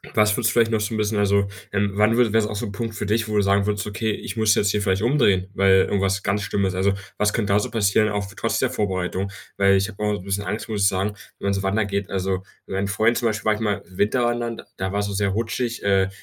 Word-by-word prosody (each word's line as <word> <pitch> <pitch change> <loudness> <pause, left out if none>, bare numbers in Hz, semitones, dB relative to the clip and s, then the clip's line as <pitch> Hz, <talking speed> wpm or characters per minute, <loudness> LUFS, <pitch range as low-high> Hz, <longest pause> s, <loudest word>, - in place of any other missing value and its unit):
was 105 -1 +4
würdest 115 -2 +2
du - - -2
vielleicht 115 0 +3
noch 110 -1 +1
so 105 +2 -2
'n - - -1
bisschen 105 0 0
also, 100 0 +2 0.2
ähm, 100 0 0
wann 105 +3 +3
würde 120 -4 +3
wäre 110 0 +4
es 105 - -3
auch 105 - -4
so 120 - -3
'n 100 - -6
Punkt 115 +1 -4
für 105 - -4
dich, 110 +2 0
wo 105 - -2
du - - +5
sagen 100 0 +2
würdest: 105 -1 -1
„Okay, 105 +2 -2
ich 105 - -5
muss 110 -2 +3
jetzt 100 - +2
hier 105 -1 0
vielleicht 95 -1 +1
umdrehen, 110 -7 +2
weil 95 0 +4
irgendwas 95 -1 0
ganz 100 +1 0
Schlimmes 100 -2 -1
"also, 95 +2 +2 0.2
was 105 0 +2
könnte 105 -3 0
da 105 - +4
so - - -3
passieren, 110 0 +2
auch 100 -1 -2
trotz - - -1
der - - +1
Vorbereitung? 95 -1 -2 0.3
Weil 100 0 +4
ich 95 +1 0
habe 105 -1 -7
auch 105 - +1
so 105 - -3
'n 90 - -12
bisschen 100 +1 -2
Angst, 105 +2 -4
muss 105 -3 -3
ich 95 - +5
sagen, 95 +2 -1 0.3
wenn - - -7
man 100 - +2
so 95 0 -2
wandern 100 +2 +1
geht. 100 -1 -2
Also, 95 -1 -2 0.2
mit - - -6
meinem 100 +1 0
Freund 110 +4 +2
zum 120 -1 +1
Beispiel 105 -1 -4
war 110 - +4
ich 105 - -5
mal 105 -3 -1
Winterwandern, 120 +5 0
da 95 0 -3
war 100 - -1
es 100 - 0
so 100 - -4
sehr 100 0 +1
rutschig, 115 +3 -2
äh, 95 -1 +2
100 Hz, 290 wpm, -23 LUFS, 100-110 Hz, 0.3 s, du